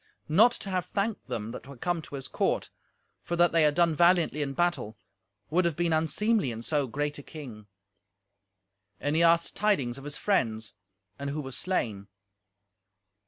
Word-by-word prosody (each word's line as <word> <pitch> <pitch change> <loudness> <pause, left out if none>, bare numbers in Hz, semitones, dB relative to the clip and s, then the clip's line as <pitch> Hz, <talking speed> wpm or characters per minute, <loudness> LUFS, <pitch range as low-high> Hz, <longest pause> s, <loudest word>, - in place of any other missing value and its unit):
Not 210 +10 +6
to 195 - -5
have 180 -1 -1
thanked 205 +3 -2
them 110 0 -4
that - - -9
were 140 -2 -10
come 175 +5 -1
to 145 - -9
his 135 -1 -6
court, - - -1 0.5
for 175 - -3
that 175 0 +4
they 165 - +3
had 150 -1 +4
done 170 -1 +3
valiantly 170 -2 +3
in 140 -1 -2
battle, 175 -10 -1 0.5
would 180 +3 +3
have 170 -3 0
been 170 0 +1
unseemly 165 - +1
in 115 0 -6
so 145 0 0
great 145 +4 -3
a - - -7
king. 125 -9 -10 1.3
And 145 +2 -1
he 165 - +3
asked 170 0 +3
tidings 140 -12 +1
of - - -12
his 145 0 -5
friends, 110 - 0 0.5
and 140 0 -3
who 145 +2 -3
was 135 -4 -5
slain. 110 - -1
155 Hz, 175 wpm, -28 LUFS, 135-175 Hz, 1.3 s, Not